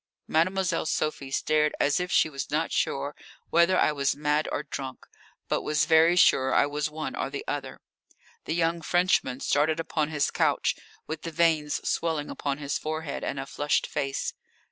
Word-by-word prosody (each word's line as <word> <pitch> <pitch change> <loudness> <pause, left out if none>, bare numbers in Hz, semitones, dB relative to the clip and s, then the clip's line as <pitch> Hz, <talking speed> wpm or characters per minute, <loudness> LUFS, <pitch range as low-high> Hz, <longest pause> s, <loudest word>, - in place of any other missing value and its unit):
Mademoiselle 175 0 +1
Sophie 155 -3 -2
stared 150 +2 +1
as 145 +3 +2
if 180 0 -3
she - - +4
was 140 -3 -5
not 155 +3 -1
sure 140 +1 -1 0.4
whether 170 +3 +4
I - - +4
was 140 -2 0
mad 150 +1 0
or 150 - -2
drunk, 135 -3 -7 0.4
but - - 0
was 150 -1 +1
very 165 +1 +5
sure 130 -7 +4
I - - +5
was 145 +1 -2
one 155 +1 -5
or - - -2
the 140 0 -6
other. 140 -2 -4 0.6
The 160 - -2
young 170 0 +1
Frenchman 170 -7 +1
started 155 +3 +1
upon 155 -2 -1
his 150 -2 0
couch, - - +1 0.3
with 155 0 -5
the 165 - -5
veins 160 -2 +1
swelling 160 -3 -1
upon 140 -1 -3
his 145 -1 -3
forehead 155 -1 -4
and 140 - -3
a 135 - -4
flushed 145 +2 0
face. 135 -1 -2
150 Hz, 175 wpm, -27 LUFS, 145-165 Hz, 0.6 s, very